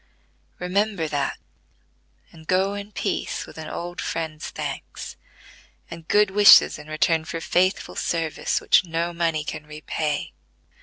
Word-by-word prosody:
Remember 190 -1 0
that, 145 -2 -2 0.9
and 160 -1 -16
go 190 +2 +2
in 205 +1 -7
peace - - -2
with - - -12
an - - -6
old 175 +1 -5
friend's 160 -2 -4
thanks, - - -6 0.8
and 165 -1 -9
good 210 -1 +4
wishes 205 +1 +7
in 150 - -11
return 160 +1 +1
for 165 +1 -5
faithful 185 +3 +1
service, 165 -2 -1
which - - +4
no 170 0 -2
money 165 -2 0
can 150 0 -6
repay." 150 0 -3
165 Hz, 135 wpm, -24 LUFS, 155-185 Hz, 0.9 s, wishes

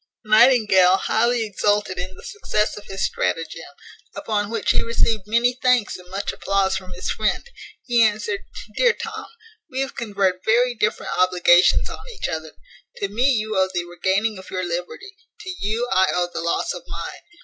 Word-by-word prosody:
Nightingale 215 -5 +5
highly 235 +3 +1
exulted 205 -2 0
in 185 +1 -5
the - - -14
success 215 - -1
of 205 - -11
his 195 0 -2
stratagem, 165 0 -2 0.5
upon 205 -2 -2
which 225 -1 0
he - - +2
received 225 -3 0
many 235 +3 +2
thanks 250 -4 +2
and 180 0 -12
much 195 +2 -3
applause 195 -1 0
from 185 -1 -6
his 180 - -3
friend. 215 - -1 0.4
He 240 -2 +2
answered, 210 -2 +1 0.4
"Dear 485 -2 +4
Tom, 450 -3 -7 0.4
we 260 +1 -2
have 270 - -4
conferred 195 -5 -1
very 245 +3 +3
different 215 -2 -1
obligations 180 -1 +4
on - - -7 0.2
each - - -3
other. 160 -1 -5 0.4
To 200 - -3
me 240 +7 +2
you 215 -3 -1
owe 190 0 +2
the 175 -1 -2
regaining 190 +4 -1
your 185 0 -3
liberty; 180 - -5 0.2
to 375 - -6
you 220 +4 -1
I 190 0 +4
owe 175 0 -1
the - - -3
loss 170 - -1
of - - -7
mine. - - -7
205 Hz, 170 wpm, -22 LUFS, 185-235 Hz, 0.5 s, Nightingale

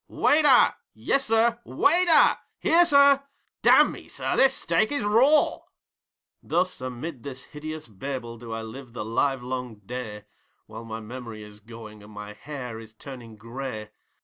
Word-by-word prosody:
'Waiter!' 290 -4 +4 0.2
'Yessir!' 235 -3 +1
'WAITER!!' 345 +1 +4 0.2
'Here, 345 +2 +4
sir!' 280 -2 +5 0.4
'Damme, - - +3
sir, - - -3
this 270 0 +4
steak 220 +3 0
is 285 - -2
RAW!' 250 +9 +3 0.8
Thus 180 0 -1
amid 130 +2 -6
this 135 -1 -8
hideous 155 -1 -8
Babel 120 +1 -7
do 115 -1 -10
I 110 0 -4
live 120 +2 -10
the 115 -3 -5
livelong 125 0 -2
day, 110 -3 -7 0.4
While 115 - -10
my 110 0 -7
memory 115 -1 -9
is 105 0 -13
going, 110 -1 -12
and 105 +1 -15
my 105 0 -9
hair 125 -2 -8
is 110 0 -14
turing 120 -4 -11
grey. 115 -1 -7
125 Hz, 140 wpm, -25 LUFS, -, 0.8 s, sir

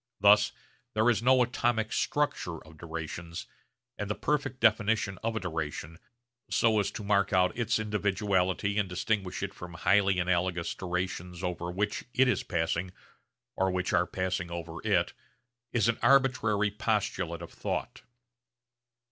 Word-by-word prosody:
Thus 105 +1 +6 0.4
there 110 +3 +4
is 115 - 0
no 130 +1 +5
atomic 115 -2 0
structure 145 - 0
of 80 -1 -16
durations, 85 +1 -6 0.5
and 105 -1 -3
the 105 - 0
perfect 145 -3 -1
definition 110 -3 +2
of 115 0 -1
a - - 0
duration, 80 -2 -4 0.5
so 110 -2 +3
as 100 - +1
to - - -6
mark 100 -1 +2
out 90 -1 +3
its 115 -1 +1
individuality 100 -2 0
and 100 -3 0
distinguish 95 0 -1
it 100 0 -3
from 90 0 -9
highly 95 +1 +3
analogous 90 -1 0
durations 90 -1 -4
over 85 -1 -2
which 100 +4 -2
it 130 +2 +5
is 125 - +2
passing, 85 +1 -1 0.7
or 95 0 +2
which 90 0 -1
are 90 -1 +3
passing 90 -1 -2
over 85 -1 -6
it, 90 -6 +2 0.6
is 115 -3 +2
an 115 - +1
arbitrary 120 -6 +3
postulate 100 -6 -1
of 85 - -10
thought. - - -4
95 Hz, 145 wpm, -29 LUFS, 90-110 Hz, 0.7 s, Thus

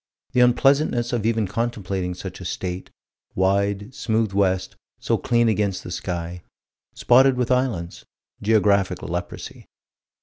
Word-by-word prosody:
The - - +1
unpleasantness 125 0 +3
of 110 -2 0
even 115 -2 +1
contemplating 95 -4 -3
such 95 +1 -8
a - - -7
state 90 +1 -4 0.5
wide, 100 +4 0
smooth 110 -3 -1
west, 95 -1 0 0.2
so - - 0
clean 120 -1 +2
against 105 -3 0
the 90 - -8
sky 85 0 -4 0.5
spotted 130 +1 +5
with 125 0 0
islands 120 -10 -1 0.4
geographic 100 -3 +2
leprosy. 90 +1 -6
100 Hz, 125 wpm, -23 LUFS, 95-120 Hz, 0.5 s, spotted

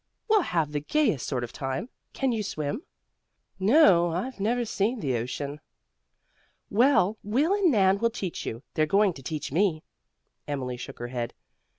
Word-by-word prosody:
We'll 430 -2 +5
have 165 - 0
the 150 - -1
gayest 220 - +1
sort 125 -3 -1
of 120 - -5
a - - -29
time. 135 - -3 0.2
Can 270 -2 0
you 225 -2 -1
swim?" 155 - -3 0.8
"No, 190 - +5
I've 190 +9 -3
never 235 +4 +1
seen 220 +3 0
the 135 - -1
ocean." 140 +5 -4 1.1
"Well, 220 -3 +3
Will 270 - +1
and 400 -3 +3
Nan 195 -4 +4
will 230 - +2
teach 195 -6 -5
you. 115 +4 -5
They're 155 0 +2
going 200 +2 +3
to 135 - -11
teach 150 +1 -4
me." 165 -1 +1 0.6
Emily 130 -4 -3
shook 130 +2 -8
her 120 0 -5
head. 120 -2 -4
185 Hz, 170 wpm, -27 LUFS, 145-230 Hz, 1.1 s, We'll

